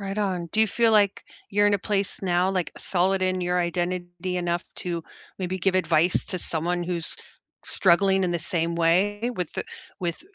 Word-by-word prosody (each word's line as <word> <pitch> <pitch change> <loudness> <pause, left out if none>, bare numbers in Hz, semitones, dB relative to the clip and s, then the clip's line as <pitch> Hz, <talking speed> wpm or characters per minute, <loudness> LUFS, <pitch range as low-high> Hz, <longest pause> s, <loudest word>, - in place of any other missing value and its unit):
Right 195 0 -4
on. 185 -5 -1
Do 220 - +3
you 220 - +4
feel 230 +1 +3
like 205 -2 +3 0.3
you're 205 +1 +4
in 205 - +4
a 200 - +1
place 200 0 -2
now, 180 0 +2
like, 185 -3 -1
solid 190 +1 +1
in 185 0 0
your 180 0 0
identity 175 +1 -2
enough 175 0 -1
to 170 -2 -2 0.4
maybe 185 +1 -2
give 190 +1 +1
advice 170 -1 +2
to 185 - -2
someone 175 +1 -1
who's 170 -2 -3 0.5
struggling 190 +1 +3
in 180 - +1
the 175 - 0
same 170 0 -2
way 205 +8 +2
with 180 -4 -3
the - - -3 0.3
with 170 -2 -3
180 Hz, 185 wpm, -25 LUFS, 175-195 Hz, 0.5 s, you